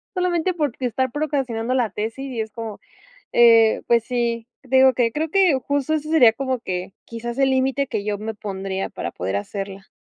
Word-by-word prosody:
solamente 360 0 +1
por 295 -6 0
estar 260 0 -1
procrastinando 260 -5 -1
la 245 -4 +1
tesis 225 +7 -4
y 230 - -2
es 220 - -5
como, 225 -2 -7 0.5
eh, 230 -2 +6
pues 235 -1 +3
sí, 235 -2 -1 0.2
digo 265 0 +5
que 230 -2 +1
creo 315 +1 -2
que 380 -4 +4
justo 285 +1 0
eso 305 0 -3
sería 250 -9 +6
como 260 +2 -2
que 185 -3 -4
quizás 235 +2 -6
el 270 -1 +3
límite 265 +1 +1
que 215 -5 -3
yo 205 -1 -2
me 220 +1 -5
pondría 195 -2 -4
para 85 - -5
poder 95 +2 -3
hacerla. 195 - -6
240 Hz, 185 wpm, -22 LUFS, 220-270 Hz, 0.5 s, eh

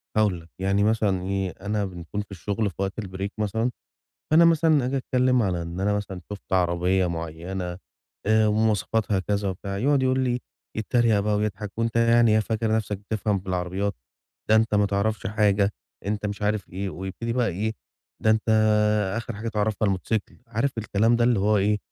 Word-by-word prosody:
هاقول 105 -5 +2
لك. 85 - -18
يعني 95 +1 +2
مثلًا 105 -4 +2
إيه، 95 0 -1
أنا 105 0 -1
بنكون 90 +2 -5
في 105 - -12
الشُغل 100 +4 -2
في 95 - -14
وقت 100 +3 -2
الbreak 95 0 -4
مثلًا، 110 +3 0 0.6
فأنا 160 +2 +7
مثلًا 160 -4 +4
آجي 135 +2 -1
أتكلِّم 125 -1 +2
على 90 -4 0
إن 85 +2 -5
أنا 105 +1 +1
مثلًا 100 -3 -4
شُفت 100 - -10
عربية 90 +1 +2
معيّنة 85 +2 -4 0.5
آآ 110 +1 +4
ومواصفاتها 105 -1 +1
كذا 100 +1 -1
وبتاع، 100 +1 -4
يقعًد 140 +3 +2
يقول 130 0 +2
لي 125 -1 0 0.4
يتّريق 110 -1 +2
بقى 105 +1 +1
ويضحك 105 -1 -3
"وأنت 115 0 0
يعني 115 0 +5
إيه 110 - +5
فاكر 110 0 0
نَفْسك 105 -2 -2
بتفهم 105 0 -1
في 95 - -20
العربيات، 95 +3 -1 0.6
ده 110 - +6
أنت 110 -1 +3
ما 105 0 +4
تعرفش 100 +1 -1
حاجة،" 105 -1 +2 0.3
أنت 105 +1 -2
مش 100 0 -4
عارف 105 0 -1
إيه 95 +2 -4
ويبتدي 95 +7 -4
بقى 120 -1 +1
إيه، 105 +5 -2 0.5
"ده 110 - +4
أنت 110 +1 0 0.7
آخِر 115 -1 -5
حاجة 110 +2 -5
تعرفها 110 0 0
الموتوسيكل." 100 +2 -1
عارف 115 +5 0
الكلام 110 +2 +2
ده 120 - +2
اللي 120 -3 +3
هو 105 +2 +3
إيه، 105 +2 +2
105 Hz, 180 wpm, -25 LUFS, 95-110 Hz, 0.7 s, فأنا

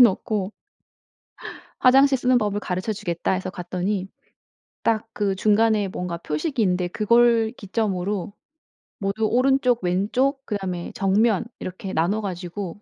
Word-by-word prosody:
놓고 210 -3 +3 1.3
"화장실 270 +1 +5
쓰는 250 0 +3
법을 205 -2 -1
가르쳐 185 +3 -2
주겠다." 175 -4 -2
해서 185 0 -2
갔더니 185 +2 -3 0.7
딱 225 -1 +1
그 200 -2 0
중간에 215 0 +2
뭔가 180 -2 -4
표식이 195 - -2
있는데 180 -2 +1
그걸 230 +2 +3
기점으로 200 -1 -2 0.7
모두 200 +2 -1
오른쪽, 250 -1 +2
왼쪽 245 +10 0
그다음에 190 -5 -4
정면 200 +2 +2
이렇게 185 +1 -6
나눠 180 +7 +1
가지고 185 0 -5
205 Hz, 280 characters per minute, -23 LUFS, 185-225 Hz, 1.3 s, 화장실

